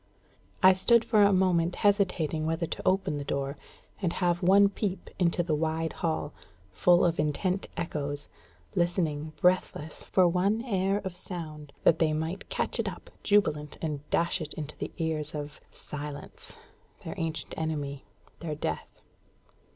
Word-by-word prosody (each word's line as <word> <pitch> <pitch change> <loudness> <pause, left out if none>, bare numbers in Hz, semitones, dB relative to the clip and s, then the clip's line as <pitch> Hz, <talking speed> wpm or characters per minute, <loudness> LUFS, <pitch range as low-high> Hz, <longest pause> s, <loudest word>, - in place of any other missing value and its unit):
I 185 0 +9
stood 230 +5 +5
for 215 -2 +4
a 200 0 +6
moment 180 -2 +2
hesitating 180 -6 +2
whether 165 +1 0
to - - -5
open 185 -5 +2
the - - -4
door, 140 0 -2 0.5
and 175 -4 0
have 175 -1 +1
one 195 +2 +6
peep 195 -1 -3
into 175 -1 +2
the 165 -2 -1
wide 160 +1 0
hall, 160 -3 -2 0.4
full 175 - +4
of 170 -2 +1
intent 180 +6 0
echoes, 145 -3 -3 0.5
listening 165 -4 0
breathless 180 -4 +1
for 185 -2 +4
one 195 +6 +1
air 195 -2 +1
of 185 -2 -4
sound, 155 -5 -7
that 165 - +5
they 155 -2 +3
might 160 +5 -3
catch - - -1
it - - 0
up - - -11
jubilant 155 -8 +2
and 150 -3 -2
dash 170 +1 +1
it 155 -1 -6
into 155 -1 -6
the - - -5
ears 155 -2 -2
of 150 0 -6
Silence 145 -1 -8 0.5
their - - -4
ancient 160 -1 -3
enemy 145 -3 -3 0.4
their 160 -3 -4
Death. 80 - -5
165 Hz, 150 wpm, -29 LUFS, 150-185 Hz, 0.5 s, I